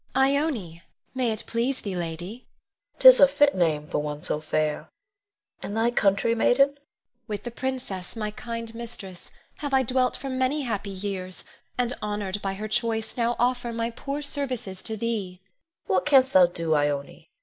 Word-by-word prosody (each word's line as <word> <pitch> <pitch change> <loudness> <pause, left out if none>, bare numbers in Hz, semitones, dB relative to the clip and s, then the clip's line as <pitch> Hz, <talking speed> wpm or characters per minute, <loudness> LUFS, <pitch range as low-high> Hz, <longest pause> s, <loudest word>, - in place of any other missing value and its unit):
Ione; 265 - +1 0.3
may 255 -3 0
it 220 - -3
please 245 +3 -1
thee, 200 -3 -4
lady. 175 +5 -5 0.6
Queen. - - -34
'Tis - - +10
a 280 - +9
fit 285 +1 +3
name 160 -5 +1
for - - -1
one 150 0 -4
so 150 - -1
fair; 155 -1 -1 0.7
and 205 - -4
thy 230 +1 +2
country, 200 0 +2
maiden? 250 +4 +4
Ione. 285 - -22 0.5
With 210 -2 -4
the 240 - -5
princess, 240 -7 -4
my 215 -2 -3
kind 230 +1 -6
mistress, 220 -6 -8 0.3
have 285 -3 -1
I 265 - +4
dwelt 255 +1 +1
for 275 - -6
many 260 +3 0
happy 210 -5 -3
years; 190 -1 -5 0.3
and 245 0 0
honored 205 -1 -3
by 195 -1 -2
her 215 +2 -5
choice 220 0 -1
now 240 0 +1
offer 245 -1 0
my 230 0 -2
poor 280 +5 -5
services 255 -10 -3
to 220 - -4
thee. 210 -5 -3 0.5
Queen. 190 - 0
What 185 - 0
canst 265 -3 +5
thou 185 -2 +7
do, 165 -2 -1
Ione? 145 -1 -1
225 Hz, 175 wpm, -26 LUFS, 185-255 Hz, 0.7 s, Tis